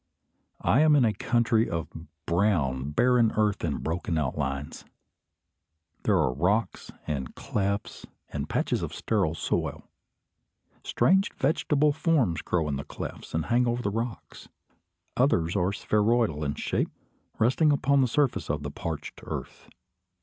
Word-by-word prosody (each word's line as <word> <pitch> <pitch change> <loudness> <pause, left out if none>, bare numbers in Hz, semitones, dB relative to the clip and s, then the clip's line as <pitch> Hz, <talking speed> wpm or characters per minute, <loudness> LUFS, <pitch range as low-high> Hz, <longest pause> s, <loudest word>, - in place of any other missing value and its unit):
I 120 - +4
am 155 -1 +5
in 135 -4 +5
a 110 - +2
country 115 -1 +1
of 85 -1 -3 0.4
brown 80 -8 +1
barren 120 +7 +3
earth 105 -2 +1
and 80 -4 -2
broken 85 0 -2
outlines. 70 -1 -3 1.2
There - - +4
are 65 - +2
rocks 95 - 0
and 70 -5 -4
clefts 100 0 -3 0.2
and 75 0 -4
patches - - 0
of - - -4
sterile 95 -8 0
soil. - - -2 1.0
Strange 190 +3 +2
vegetable 150 0 +2
forms 145 - +1
grow 85 -3 0
in 70 -2 -1
the 70 - -5
clefts - - -7
and 80 - 0
hang 120 +1 +2
over 120 +1 -1
the 100 - 0
rocks. 115 +2 -5 0.7
Others 85 +3 +2
are 95 -1 +1
spheroidal 105 -6 +1
in 70 -1 -2
shape, - - -1 0.5
resting 135 +7 +3
upon 140 0 +3
the 130 - +3
surface 140 +1 0
of 75 0 -2
the 70 - -4
parched 80 0 -6
earth. - - -7
100 Hz, 140 wpm, -27 LUFS, 80-120 Hz, 1.2 s, am